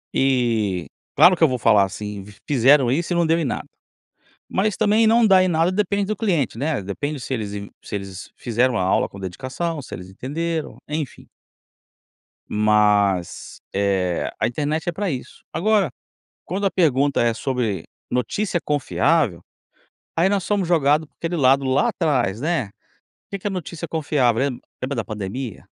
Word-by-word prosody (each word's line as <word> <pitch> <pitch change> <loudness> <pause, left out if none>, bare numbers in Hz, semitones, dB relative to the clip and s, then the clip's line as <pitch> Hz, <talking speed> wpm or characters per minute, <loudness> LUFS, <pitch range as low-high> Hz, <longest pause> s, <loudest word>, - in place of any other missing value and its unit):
E 115 -9 +1 0.3
claro 180 +1 +7
que 165 - 0
eu 160 - +8
vou 130 - -1
falar 110 -4 +5
assim: 100 0 -6 0.2
"Fizeram 135 -1 +5
isso 170 +6 0
e - - 0
não 170 0 +3
deu 165 +1 +2
em - - 0
nada". 125 - -3 0.8
Mas 205 +2 0
também 220 +1 +4
não 230 +1 +5
dá 190 -3 +6
em 185 - +2
nada 165 +1 +2
depende 200 0 0
do 215 +2 -2
cliente, 165 - 0
né, 150 -4 -1
depende 145 +10 -4
se 130 - -4
eles 105 -5 -3
in 100 0 -6
se - - -6
eles 95 -2 -7
fizeram 120 +1 +1
a - - 0
aula 95 - +2
com 100 - -11
dedicação, 130 - -4
se - - -8
eles 90 +1 -10
entenderam, 160 - -4
enfim. 150 -2 -5 1.2
Mas, 105 -4 +1
eh, 95 -3 0
a - - +2
internet 150 +6 -2
é - - 0
pra 195 +2 -2
isso. 130 -2 -6
Agora 195 -1 +2 0.5
quando 195 +4 -3
a - - +2
pergunta 145 -6 +2
é 115 -1 +2
sobre 115 - -2 0.3
notícia 175 - -1
confiável, 145 - +1 0.8
aí 170 +3 +4
nós 195 -1 +1
somos 200 -2 0
jogado 155 -2 +3
aquele 170 0 -3
lado 135 0 +4
lá, 130 - +2
atrás, 130 - 0
né? 160 -4 0 0.6
O - - -79
que 200 - -4
que 205 - -6
é - - -5
notícia 170 -3 -5
confiável? 145 -7 +1
Lem 135 -2 -1 0.2
lembra 130 +2 -2
da 115 - -1
pandemia? 105 +3 -6
140 Hz, 170 wpm, -22 LUFS, 110-170 Hz, 1.2 s, eu